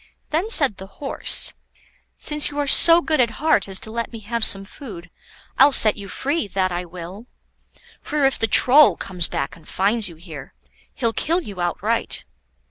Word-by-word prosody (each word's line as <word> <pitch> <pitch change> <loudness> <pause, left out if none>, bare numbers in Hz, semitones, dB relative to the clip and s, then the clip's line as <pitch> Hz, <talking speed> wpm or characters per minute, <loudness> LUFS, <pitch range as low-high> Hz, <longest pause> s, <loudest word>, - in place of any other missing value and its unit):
Then 335 +8 -2
said 280 - +4
the 190 - -11
Horse: 275 - 0 0.6
"Since 300 -1 +1
you 290 - -10
are 290 - -1
so 335 +4 +7
good 310 -2 -1
at 230 -2 -2
heart 310 -6 0
as 190 -1 -4
to 220 - -9
let 230 +1 -5
me 230 - -9
have 230 +2 -5
some 195 -2 +3
food, 190 - -12 0.5
I'll 275 +2 +6
set 215 -5 +4
you 200 -1 -10
free, 280 +4 -3
that 190 -1 -2
I 175 +1 -5
will. 180 +6 -11 0.7
For 295 -2 -2
if 270 - 0
the 225 - 0
Troll 265 +7 +5
comes 180 -2 -4
back - - -5
and 165 -3 -20
finds 205 +1 -1
you 170 - -14
here, 160 -3 -12 0.4
he'll 230 -3 -2
kill 335 +9 -1
you 200 - -9
outright. 175 0 -2
225 Hz, 185 wpm, -20 LUFS, 185-290 Hz, 0.7 s, so